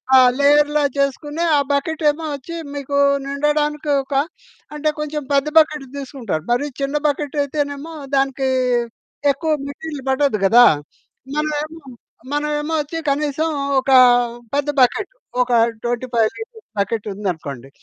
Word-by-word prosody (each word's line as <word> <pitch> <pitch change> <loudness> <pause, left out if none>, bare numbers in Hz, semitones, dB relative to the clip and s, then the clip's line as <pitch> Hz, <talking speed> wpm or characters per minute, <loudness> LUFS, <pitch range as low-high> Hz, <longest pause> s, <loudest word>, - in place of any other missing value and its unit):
ఆ - - +9 0.2
లేయర్‌లా 295 +1 +4
చేసుకొని, 290 +4 -1
ఆ - - +4
బకెటేమో 305 +2 0
ఒచ్చి 280 +5 -8 0.2
మీకు 280 0 -3 0.3
నిండడానికొక 295 0 0 0.6
అంటే 305 +1 0
కొంచెం 300 0 -3
పెద్ద 280 +1 +2
బకెట్ 300 -3 +4
తీసుకుంటారు. 250 - -4
మరి 245 +4 +1 0.2
చిన్న 275 +2 -1
బకెటయితేనేమో 290 +1 -2 0.2
దానికి 270 0 +1 0.8
ఎక్కువ 315 +3 -2 0.2
మెటీరియల్ 285 -1 -7
పడదు 265 -4 +2
గదా. 240 +5 +7 0.7
మనమేమో, 305 +1 -2 0.5
మనమేమో 295 +1 -1
ఒచ్చి 325 +3 -5
కనీసం 300 +2 -1 0.3
ఒక 265 +1 -1 0.6
పెద్ద 290 +1 0
బకెట్ 390 - +2 0.3
ఒక 250 0 0 0.3
25 240 -2 0
లీటర్స్ 450 0 -10
బకెట్ 215 +1 -1
ఉందనుకోండి, 155 - -5
285 Hz, 110 wpm, -20 LUFS, 265-300 Hz, 0.8 s, ఆ